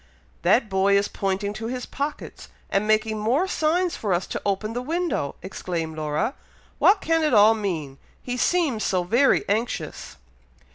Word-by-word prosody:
'" - - -34
"That 235 - +3
boy 195 0 +3
is 200 - +1
pointing 195 +1 -2
to 220 +1 -5
his 250 +1 -4
pockets, 285 +2 -6 0.2
and 200 +2 +1
making 215 0 +1
more 255 - +1
signs 345 +1 +1
for 200 -5 0
us 175 - -2
to - - -3
open 205 +2 -1
the 245 - -2
window!" 320 - -2
exclaimed 170 -4 -4
Laura. 155 - -1 0.5
"What 395 +1 +5
can 325 0 +1
it 300 -6 +2
all 210 +1 +7
mean! 165 -11 -4 0.2
he 245 - -4
seems 275 - +1
so 185 -2 +1
very 235 +10 +3
anxious!" 220 +4 -3
215 Hz, 170 wpm, -24 LUFS, 195-270 Hz, 0.5 s, all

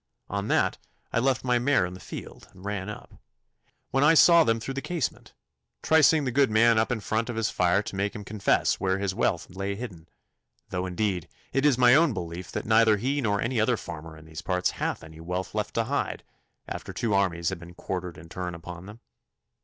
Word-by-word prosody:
On 100 +1 -2
that - - +1 0.3
I - - +3
left 130 +1 +1
my 125 -1 +2
mare 130 -5 +3
in 90 - -6
the 90 - -10
field - - -9
and 95 +1 -14
ran 100 -1 -3
up, 105 - -10 0.7
when 135 - +2
I 155 +3 +6
saw 170 +1 +8
them 115 -5 +1
through 135 +4 -5
the 135 - -3
casement, 170 -6 -4 0.5
tricing 160 -1 +5
the 130 - -1
good 135 +1 +3
man 110 +1 +5
up 110 - +1
in 115 -3 -1
front 110 +3 -1
of 120 - -3
his 115 -1 0
fire 90 +3 +2
to 100 - -7
make 100 +1 -1
him 105 - -6
confess 100 0 +1
where 95 0 +1
his 100 -1 -1
wealth - - -1
lay 100 +2 -3
hidden, 95 -7 -8 0.6
though 90 0 -2
indeed 90 -1 -1 0.3
it 135 +2 +3
is 135 -5 +3
my 125 -1 +6
own 155 -1 +5
belief 85 +1 -6
that - - -4
neither 110 -1 +5
he 135 +7 -1
nor 105 -4 +1
any 120 0 0
other 115 +2 +2
farmer 80 -3 -8
in 80 - -14
these 80 +1 -8
parts 90 0 0
hath - - -3
any 80 0 -12
wealth 90 +3 -4
left 105 -1 -3
to 115 - +2
hide, 140 +5 -2 0.4
after - - -6
two 115 -3 -1
armies 90 -4 +1
have 95 -2 -5
been 85 0 -12
quartered 90 -2 -5
in 80 +1 -12
turn 90 +1 -5
upon 85 +2 -9
them. 105 +3 -12
105 Hz, 215 wpm, -27 LUFS, 90-120 Hz, 0.7 s, saw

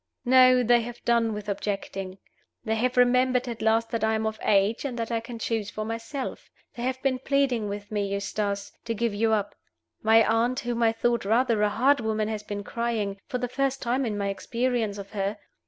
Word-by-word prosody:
"No, 255 0 +6
they 240 0 +4
have 240 +1 -8
done 235 -1 +3
with 210 -1 -6
objecting. 195 -2 -4 0.5
They 220 - 0
have 245 +3 0
remembered 250 +1 +3
at 235 -2 -5
last 225 +1 +2
that 230 -2 -1
I 220 0 +2
am 220 0 -1
of 220 0 -3
age, 205 +2 +2
and 260 -4 -4
that 230 0 -3
I 230 - +1
can 230 +1 -8
choose 225 -2 -2
for 215 +1 -5
myself. 230 +5 -5 0.2
They 235 - -8
have 260 +1 -1
been 260 -2 +1
pleading 265 -6 +1
with 205 +1 -6
me, 205 -1 -1
Eustace, 200 0 -2
to 230 -1 -2
give 230 0 0
you 220 +2 +1
up. 205 -2 0 0.5
My 220 0 +5
aunt, 235 +4 +1
whom 240 -1 -2
I 225 -1 +4
thought 235 +1 0
rather 225 +1 +2
a 210 - +3
hard 260 +7 +3
woman, 220 -1 -1
has 215 -1 -3
been 205 -1 -5
crying 220 -4 -2
for 250 - -2
the 245 0 -2
first 270 +1 -1
time 250 +2 0
in 215 -4 -2
my 200 -1 -1
experience 230 0 -1
of 200 -1 -8
her. 200 0 -2
225 Hz, 210 wpm, -26 LUFS, 210-245 Hz, 0.5 s, No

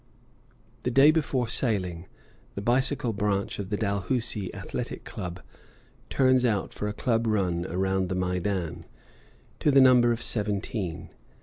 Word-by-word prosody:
The 125 - -1
day 135 +5 +6
before 140 -6 0
sailing, 95 -8 -1 0.5
the 100 - -3
bicycle 125 0 +1
branch 100 -1 -1
of 95 -2 -4
the 105 - -1
Dalhousie 105 0 -1
Athletic - - -5
Club 90 0 -6 0.7
turns 130 -1 +3
out 105 -6 0
for 105 - -3
a - - -1
club 115 0 0
run 90 -5 0
around 95 +1 0
the 95 - -1
Maidan, 90 -1 -2 0.7
to - - +2
the 140 -1 +6
number 125 -2 +6
of 120 +1 -2
seventeen. 105 -4 -3
105 Hz, 135 wpm, -27 LUFS, 95-125 Hz, 0.7 s, day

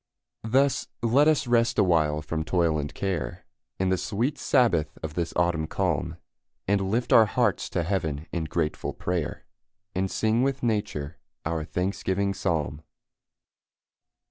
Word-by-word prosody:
Thus 135 +3 +2 0.2
let 130 +6 +4
us 155 -3 +3
rest 120 -1 +2
awhile 75 -4 +3
from 80 +1 -2
toil 85 -2 +1
and 75 0 -4
care, 95 -4 -3 0.3
In 95 0 +1
the 95 -1 +1
sweet 120 +8 -1
sabbath 115 - +2
of 80 -1 -4
this 85 0 -2
autumn 85 -3 +1
calm, - - -1 0.5
And 95 -1 +1
lift 120 +4 +1
our 110 -1 +8
hearts - - +1
to 85 - -1
heaven 80 -5 -2
in 85 -2 -2
grateful 80 -1 -2
prayer, 90 -4 -3 0.5
And 95 +1 0
sing 110 +4 +1
with 135 -1 0
nature 105 -10 -2 0.3
our 80 0 -1
thanksgiving 95 +3 -1
psalm. 80 -6 -1
95 Hz, 140 wpm, -26 LUFS, 80-110 Hz, 0.5 s, our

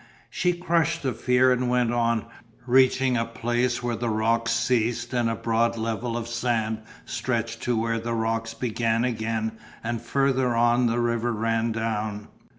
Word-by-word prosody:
She 180 0 +1
crushed 170 -2 0
the 130 -2 0
fear 125 +3 +3
and 125 0 +1
went 125 -1 +2
on, 115 -2 +1 0.4
reaching 130 0 +4
a 115 - +1
place 120 +1 -1
where 120 -1 -1
the 115 +1 -2
rocks 115 +1 +1
ceased 120 0 0
and 120 -2 +1
a 115 - -1
broad 115 +1 +1
level 115 +1 -2
of 115 -1 -4
sand 115 -2 -1 0.3
stretched 115 -1 -2
to 120 -2 +1
where 115 0 0
the 115 +1 -3
rocks 115 0 -1
began 115 -1 0
again 110 -2 -2 0.2
and 115 0 -2
further 130 0 +1
on 120 +1 +3
the 115 +1 0
river 120 0 0
ran 115 +1 0
down. 110 -2 -3
115 Hz, 160 wpm, -25 LUFS, 115-125 Hz, 0.4 s, reaching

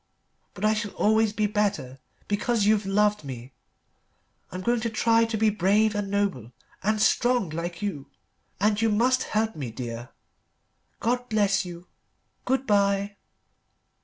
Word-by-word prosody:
But 200 +2 -3
I 215 - +4
shall 210 -2 -3
always 220 0 +3
be 210 0 0
better 200 -11 -1 0.3
because 205 +1 0
you've 210 -1 +2
loved 210 -1 +2
me. 130 -1 -8 1.0
I'm 185 - -5
going 240 +4 +1
to 230 +1 -2
try 230 +1 +3
to 225 -1 -3
be 215 0 +3
brave 210 +2 +2
and 205 -1 -3
noble 195 - -1 0.3
and 215 +2 0
strong 240 -4 +2
like 170 +3 -5
you. 150 -10 -4 0.5
And 210 +1 +2
you 225 - +3
must 250 +5 +2
help 220 +1 -1
me, 140 -6 -5
Dear. 120 0 -6 0.9
God 245 +2 -1
bless 205 -3 +2
you. 175 0 -9 0.6
Good 265 +1 0
bye." 200 -1 +1
205 Hz, 145 wpm, -26 LUFS, 185-220 Hz, 1.0 s, I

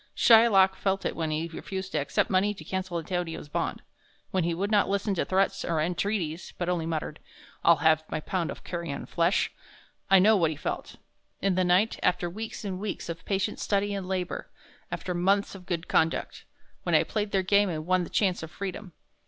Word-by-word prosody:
Shylock 220 -5 +6
felt 195 0 -1
it - - -1
when 160 -2 -2
he 155 +2 -1
refused 190 +3 -6
to - - 0
accept - - 0
money 200 +2 +2
to 160 - -10
cancel 185 +1 -3
Antonio's 165 -2 -3
bond; - - -2 0.5
when 185 -2 +1
he 170 0 0
would 200 +4 -2
not 205 -3 +3
listen 200 +1 0
to 185 - 0
threats 195 +1 +1
or 165 -2 0
entreaties, 175 0 -2
but 175 - -2
only 175 -2 0
muttered, 155 -1 -3 0.4
'I'll 170 - +7
have 160 0 +5
my - - -2
pound 170 +1 -2
of - - -7
carrion 170 -5 -4
flesh.' 170 +3 +1 0.6
I 195 - +8
know 210 +4 +6
what 170 -5 +3
he 155 - -5
felt. - - -4 0.4
In 195 -1 +1
the 185 +1 +2
night, 185 +5 +2
after 175 -1 +1
weeks 220 +2 -6
and 185 -2 -3
weeks 205 -3 -4
of 165 0 -6
patient 195 -1 -1
study 205 0 0
and 195 -2 -4
labor 185 -1 -3 0.4
after 180 - -3
months 195 +3 +1
of 190 -2 -11
good 170 -2 -2
conduct, 160 +1 0 0.4
when - - +1
I - - +5
played 210 -1 -2
their 195 -1 +1
game 200 +1 +3
and 155 -2 -4
won 185 0 +2
the - - -7
chance 190 -4 +1
of 160 - -6
freedom. 190 +1 -6
185 Hz, 200 wpm, -28 LUFS, 170-195 Hz, 0.6 s, I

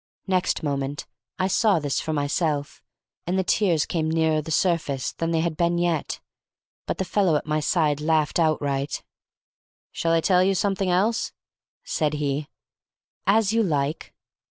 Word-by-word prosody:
Next 185 -3 0
moment 140 -1 -2 0.3
I 185 - +1
saw 205 0 +3
this 145 -3 -1
for 160 - -3
myself, 145 0 -1 0.5
and 180 +2 0
my 190 - +2
tears 175 -5 +2
came 160 -2 -1
nearer 160 -1 +2
the 150 - -9
surface 155 -5 0
than 165 - -2
they 165 -1 +1
had 165 -1 -1
been 170 +1 +1
yet; 170 -3 -1 0.7
but - - -2
the 190 - -1
fellow 185 -2 +2
at 150 - -1
my 155 0 0
side 150 -1 +1
laughed 155 +1 +1
outright. 145 -3 0 0.9
"Shall 165 0 0
I 165 - +4
tell 180 +1 +4
you 195 +1 +2
something 195 0 0
else?" 200 +6 +1 0.5
said 150 -1 -1
he. 145 0 -2 0.8
"As 215 +1 +3
you 230 - +3
like." 150 -6 -1
160 Hz, 155 wpm, -24 LUFS, 150-185 Hz, 0.9 s, I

